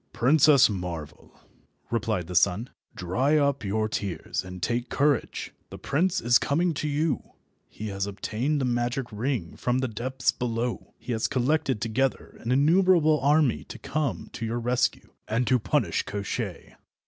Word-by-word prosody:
"Princess 140 +2 +6
Marvel," 90 -7 -6 0.5
replied 110 -6 -1
the 90 - -7
sun, 90 +7 +2 0.2
"dry 130 - +1
up 140 -4 +1
your 110 +2 0
tears 95 -6 -3
and 90 0 -8
take 120 +6 -1
courage. 145 -2 0 0.2
The - - -8
prince 180 +6 0
is 120 +2 +5
coming 165 +4 +1
to 150 - -3
you. 150 +1 -1 0.4
He 110 0 -6
has 100 0 -2
obtained 115 +8 -2
the 135 - 0
magic 120 +1 -1
ring 110 -5 -2
from 125 0 0
the 130 0 0
depths 125 +4 -1
below; 120 0 -3
he - - -7
has 110 -1 0
collected 135 -2 +1
together 120 +5 -1
an 115 - -3
innumerable 155 +2 +4
army 145 -1 +3
to - - -9
come 150 -1 -3
to - - -6
your 115 +1 -2
rescue, 125 +1 -1
and 115 +3 0
to 125 0 +3
punish 100 -6 0
Koshchei. 100 0 -5
125 Hz, 155 wpm, -26 LUFS, 110-140 Hz, 0.5 s, Princess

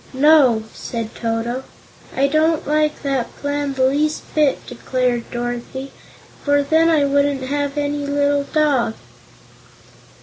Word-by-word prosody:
"No," 270 -6 +5
said 230 -2 -5
Toto. 235 +2 -2 0.5
"I 270 - +3
don't 310 +2 +2
like 305 0 0
that 270 -4 -2
plan 285 -1 -2
the 260 -1 +2
least 295 +3 0
bit," 300 -3 +1
declared 245 -1 -2
Dorothy, 245 +3 -5 0.5
"for 285 0 +2
then 320 +3 +3
I 305 -3 +3
wouldn't 280 -1 +1
have 285 +1 -2
any 290 0 -2
little 285 0 +1
dog." 275 -8 +1
280 Hz, 125 wpm, -20 LUFS, 255-290 Hz, 0.5 s, No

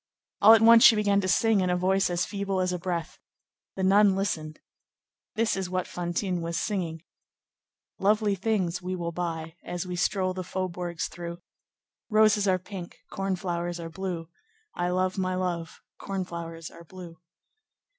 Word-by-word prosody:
All 220 - +9
at 225 - +3
once 230 0 +8
she 225 - +9
began 200 -1 +2
to 185 - -2
sing 210 +3 +3
in 185 - 0
a 180 - +1
voice 190 +1 +2
as 175 0 0
feeble 200 -2 -2
as 185 0 0
a 180 - -3
breath. 170 -1 -4 0.6
The 190 - -3
nun 195 +1 +5
listened. 160 -6 -3 0.8
This 225 0 +1
is 190 -2 -3
what 185 0 -1
Fantine 175 +1 -2
was 165 0 -3
singing:— 170 -6 -3 1.0
"Lovely 210 +1 +2
things 190 -3 -1
we 185 +1 -3
will 170 -1 -3
buy 165 -1 -4
As 175 +1 -4
we 180 -1 -4
stroll 185 +1 0
the 185 - -4
faubourgs 175 -1 -3
through. 175 0 -8 0.7
Roses 215 -2 +4
are 185 -1 +3
pink, 185 -1 -9
corn 195 0 -1
flowers 175 -1 -3
are 165 -1 -7
blue, 180 -2 -4 0.5
I 175 0 -1
love 185 +1 0
my 185 -1 0
love, 175 -3 -3 0.2
corn 195 -2 -3
flowers 165 -2 -7
are 170 - -13
blue. 170 -1 -11
185 Hz, 165 wpm, -27 LUFS, 170-195 Hz, 1.0 s, All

